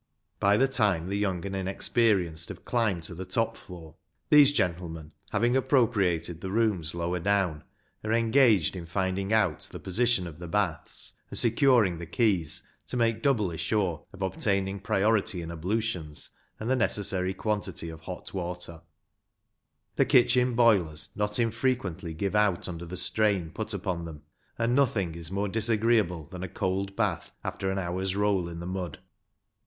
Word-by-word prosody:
By 100 +1 +4
the 135 - +4
time 100 -10 +2
the 100 - -1
young 95 -4 -1
and 100 0 -4
inexperienced 95 -3 +1
have - - -9
climbed 110 -8 0
to 85 - -5
the 90 +2 -6
top 105 +5 -1
floor, 80 -5 -12 0.3
these 145 -1 +8
gentlemen, 85 - -2 0.2
having 120 +4 +1
appropriated 105 - +1
the 95 - -4
rooms 95 -7 0
lower 85 +1 -1
down, 95 -5 0 0.4
are 110 - -2
engaged 115 - +4
in 85 -2 -7
finding 95 +2 -1
out 105 -8 +1
the - - -7
position 110 0 +1
of 85 -2 -9
the 85 - -7
baths, 90 -3 -2 0.2
and - - -5
securing 115 - +3
the 85 - -7
keys 95 - +1 0.2
to 125 - -3
make 115 -1 +1
doubly 105 - +1
sure 85 -3 0
of 95 0 -6
obtaining 95 0 0
priority 100 -1 +1
in 85 - -6
ablutions, 85 -3 -2 0.3
and 110 - -4
the 130 - +3
necessary 95 -5 +1
quantity 100 -5 -2
of 80 0 -9
hot 90 +2 -8
water; 90 -3 -5 1.2
the - - +4
kitchen 125 0 +4
boilers 95 -10 +3
not 105 0 -1
infrequently 115 -8 -1
give 100 +4 -2
out 105 -4 +2
under 85 -1 -6
the 90 +2 -6
strain 95 -2 +1
put 110 0 -5
upon 90 -4 -3
them, 75 -3 -9 0.3
and 115 +1 +1
nothing 110 -11 +2
is 85 -1 -4
more 100 +2 -1
disagreeable 110 -5 +1
than 90 +4 -9
a 95 - -4
cold 95 +3 -2
bath 95 -7 -1
after 95 - -3
an 95 - -1
hour's 95 +1 -2
roll 100 -4 +1
in 85 0 -7
the 85 - -6
mud. 90 -2 -4
95 Hz, 160 wpm, -28 LUFS, 85-110 Hz, 1.2 s, these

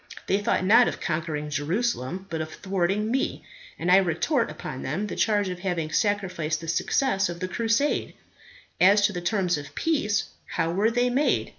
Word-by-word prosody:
They 195 - +1
thought 205 -2 0
not 230 +5 +6
of - - -3
conquering 155 -2 -3
Jerusalem, 175 - -2
but 160 -1 -2
of 155 - -4
thwarting 195 +3 -1
me; 265 +1 -1 0.3
and 175 +2 0
I 185 - +8
retort 195 - +1
upon 135 -3 -7
them 170 +10 -2
the - - -5
charge 205 -2 +1
of 180 -1 -5
having 175 -4 -2
sacrificed 180 -7 0
the 165 - -9
success 195 - +1
of 170 0 -6
the 185 - -2
crusade. 230 +8 0 0.6
As 200 +3 +6
to 210 - +1
the 175 - -4
terms 180 -3 0
of 145 - -11
peace, 275 -11 0 0.2
how 165 - 0
were 200 +5 +2
they 245 +1 +1
made? 275 +5 +1
190 Hz, 180 wpm, -25 LUFS, 165-215 Hz, 0.6 s, I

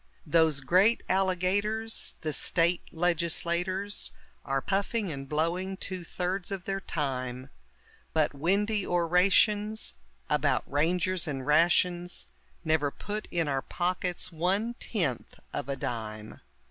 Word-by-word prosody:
Those 160 -3 +3
great 190 - +4
alligators, 195 +4 0
the 155 -2 -2
State 170 +4 +2
legislators, 175 +3 0 0.3
Are 135 -1 0
puffing 200 - -1
and 135 -2 -6
blowing 175 +5 -1
two 185 -2 -5
thirds 180 +2 -3
of 195 -2 -4
their 195 0 -1
time, 130 -6 -3 0.6
But 155 -2 +2
windy 200 +8 +1
orations 195 +5 +3 0.3
about - - +2
rangers 175 +5 +1
and 135 -3 -3
rations 175 +3 +3 0.4
Never 155 -2 +2
put 210 +8 -5
in 170 -3 0
our 135 -2 0
pockets 180 +2 -1
one 190 +8 0
tenth 165 - -2
of 140 - -3
a 140 - 0
dime. 110 -4 -5
175 Hz, 115 wpm, -29 LUFS, 150-195 Hz, 0.6 s, great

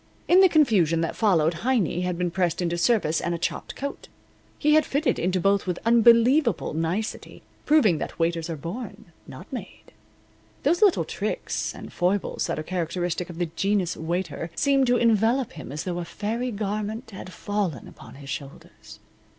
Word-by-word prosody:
In 360 - +6
the 380 - +7
confusion 200 - +3
that 165 - -2
followed 170 -6 +2
Heiny 220 - +1
had 180 -1 -2
been 175 -1 -1
pressed 175 -2 0
into 175 -1 -1
service 170 -4 +1
and 170 0 -1
a - - -3
chopped 170 - -4
coat. 280 +1 -6 0.5
He 300 +1 +3
had 310 0 +5
fitted 290 +3 0
into 185 +2 0
both 195 +2 +1
with 180 -1 -1
unbelievable 235 - +4
nicety, 165 +7 -3 0.2
proving 240 - +4
that - - -5
waiters 165 0 -1
are 165 - -3
born, 180 - -7 0.2
not - - -10
made. - - -9 0.7
Those 350 - +2
little 405 -4 +4
tricks - - -3
and - - -10
foibles 185 +3 0
that - - -2
are 155 - -3
characteristic 175 +1 -3
of 170 - -9
the 175 -2 -2
genus 195 -3 0
waiter 170 0 -3
seemed 275 -2 +2
to 245 0 +3
envelop 230 +2 +2
him 150 -5 -9
as 150 +2 -4
though 175 -1 -3
a 175 - -4
fairy 230 +8 -3
garment 215 +2 -4
had 190 -1 -9
fallen 195 - -3
upon - - -13
his 140 0 -11
shoulders. 140 -5 -9
185 Hz, 175 wpm, -25 LUFS, 170-235 Hz, 0.7 s, the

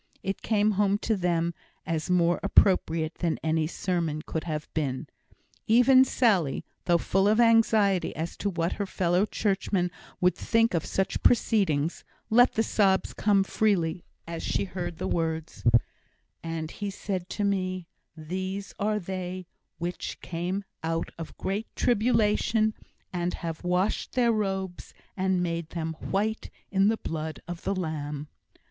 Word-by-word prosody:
It 195 +1 -3
came 215 -1 +2
home 200 0 +3
to 225 - +2
them 170 -2 0 0.3
as 165 -1 -2
more 175 -1 +3
appropriate 165 -4 +3
than 170 -2 0
any 160 0 +1
sermon 165 -3 -2
could 160 0 -4
have 155 -2 -3
been. 135 -5 -1 0.6
Even 250 +3 +7
Sally, 195 - +2 0.2
though 175 -1 +4
full 195 +3 +1
of 215 +2 +3
anxiety 220 -5 +4
as 165 +2 -4
to 205 - -1
what 170 -2 -1
her 200 - -3
fellow 180 +2 +1
Churchman 190 -4 0 0.3
would 180 0 +4
think 230 -1 +2
of 160 -4 -1
such 190 0 -1
proceedings, 180 -10 +2 0.3
let 245 +3 +6
the 225 - +2
sobs 195 -4 +2
come 200 -2 +3
freely 185 -5 +1 0.2
as 165 0 -5
she - - 0
heard 180 -3 -5
the - - -3
words: 160 -1 -2 0.8
And 165 -1 -4
he 205 -1 -4
said 190 -2 -4
to 210 - 0
me, 185 -3 -1 0.3
These 185 +5 -4
are 210 +1 +1
they 185 -1 -5 0.3
which 175 +1 -4
came 180 +4 -3 0.2
out 165 0 -2
of 165 - -8
great 205 +4 -2
tribulation, 220 -1 +2 0.4
and 175 0 -1
have 165 0 -5
washed 180 +3 0
their 245 -2 +3
robes, 190 -4 -3 0.2
and 185 -1 +1
made 170 -2 -2
them 160 -1 -3
white 215 +3 -1 0.2
in 195 0 +4
the 220 +1 +2
blood 160 -3 -4
of 175 -1 -6
the 195 - -1
Lamb. 150 -4 -4
185 Hz, 145 wpm, -27 LUFS, 165-205 Hz, 0.8 s, Even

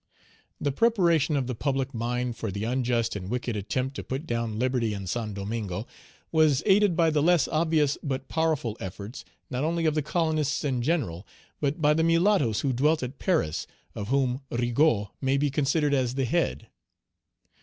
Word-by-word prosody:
The 145 - 0
preparation 170 - +3
of 135 - 0
the 125 - -3
public 135 +2 -1
mind 120 +1 -2
for 115 -1 -4
the 100 +2 -4
unjust 120 -1 0
and 95 -2 -5
wicked 120 -1 -2
attempt 130 +7 -2
to - - -4
put 135 +5 -4
down 115 -5 -2
liberty 120 -3 0
in 100 -1 -6
Saint 105 +2 -3
Domingo 100 0 -4 0.5
was 155 -4 +3
aided 200 -2 +4
by 165 -2 +3
the 150 -1 +2
less 175 0 +4
obvious 155 -3 +1
but 135 -2 -3
powerful 160 -9 0
efforts, 100 +6 -7 0.3
not 130 +2 -1
only 165 +1 0
of 155 - +3
the 155 - +1
colonists 155 -1 0
in 130 -4 0
general, 120 - -1 0.3
but 150 +3 -1
by 150 +1 +5
the 160 +1 +1
mulattoes 165 - +3
who 135 -2 0
dwelt 150 +4 +2
at 125 +2 -6
Paris, 160 - 0 0.3
of 100 - -5
whom 130 0 +1
Rigaud 120 -3 +1
may 135 0 +2
be 145 0 +1
considered 145 +1 +1
as 130 -2 +1
the 135 -1 0
head. 70 - -1
135 Hz, 175 wpm, -27 LUFS, 115-155 Hz, 0.5 s, by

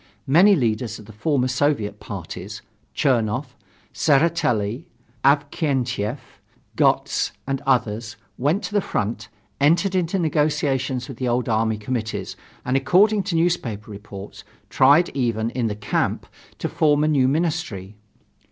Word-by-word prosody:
Many 180 +9 +6
leaders 115 - -1
of 105 - -13
the 110 - -13
former 130 +3 0
Soviet 125 -6 0
parties - - -7 0.3
Chernoff, 125 +1 0 0.4
Tseretelli, 145 -5 +1 0.4
Avksentiev, 135 - +1 0.6
Gotz - - +1
and 135 -1 -2
others 115 -3 0 0.2
went 150 +10 0
to - - -5
the 205 - +3
front, 110 - -3 0.3
entered 170 +7 +3
into 185 0 0
negotiations 140 -6 0
with 135 - -9
the 130 - -2
old 120 +1 0
army 110 -1 +1
committees, 110 +1 -4 0.3
and, 125 - 0
according 200 +10 +4
to 185 -2 -3
newspaper 130 - -1
reports, 100 -1 -10 0.3
tried 145 +6 +5
even 115 -4 -1
in 120 -2 -1
the 105 - -3
camp, 105 0 -1 0.3
to - - -2
form 150 -1 +2
a - - +2
new 140 -4 +3
ministry. 140 - -2
130 Hz, 130 wpm, -22 LUFS, 110-155 Hz, 0.6 s, Many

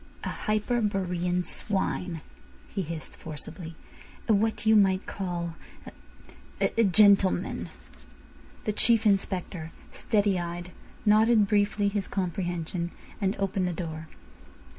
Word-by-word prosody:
"A - - -2
Hyperborean 195 -5 0
swine," 185 -5 -2 0.5
he 200 - -2
hissed 165 -2 -6
forcibly. 160 +2 -7 0.5
"A 225 - +5
what 220 +2 +1
you 220 0 +6
might 195 -2 +4
call 175 -3 -3 1.1
a—a 230 - +2
gentleman." 195 -2 +4 0.9
The 215 - -1
Chief 225 +1 +3
Inspector, 185 -5 0 0.2
steady 205 -4 +1
eyed, 175 +1 -5 0.3
nodded 215 +1 +5
briefly 205 0 +2
his 200 -1 -1
comprehension, 175 -2 -2 0.3
and 195 0 +1
opened 195 -1 0
the 180 - -2
door. 160 -2 -5
190 Hz, 105 wpm, -28 LUFS, 175-210 Hz, 1.1 s, you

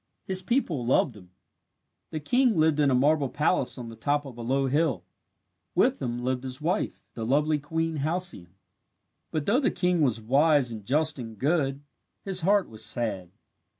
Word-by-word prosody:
His 190 -1 +1
people 190 - 0
loved 120 0 +2
him. 90 -3 -15 0.8
The 155 - -4
king 245 - +2
lived 155 -1 +3
in 145 -2 +4
a 130 - +3
marble 145 +1 +2
palace 150 -2 0
on 120 -2 -7
the 115 - -10
top 145 +6 -1
of 130 -3 -9
a 120 - -8
low 135 +4 0
hill. 135 - 0 0.7
With - - +2
him 120 -1 -3
lived 130 0 -1
his 130 0 -5
wife, 175 +7 -2
the 115 - -5
lovely 150 +5 +1
Queen 160 +2 -2
Halcyone. 150 - -1 0.7
But 155 -2 -3
though 230 +6 +3
the 275 - +2
king 180 -2 0
was 125 -6 +2
wise 140 +3 +3
and 110 -2 -7
just 150 +2 +1
and 115 -3 -8
good, 140 - 0 0.4
his 190 -2 -2
heart 200 +3 +3
was 110 0 -6
sad. 105 -4 0
145 Hz, 180 wpm, -27 LUFS, 120-160 Hz, 0.8 s, in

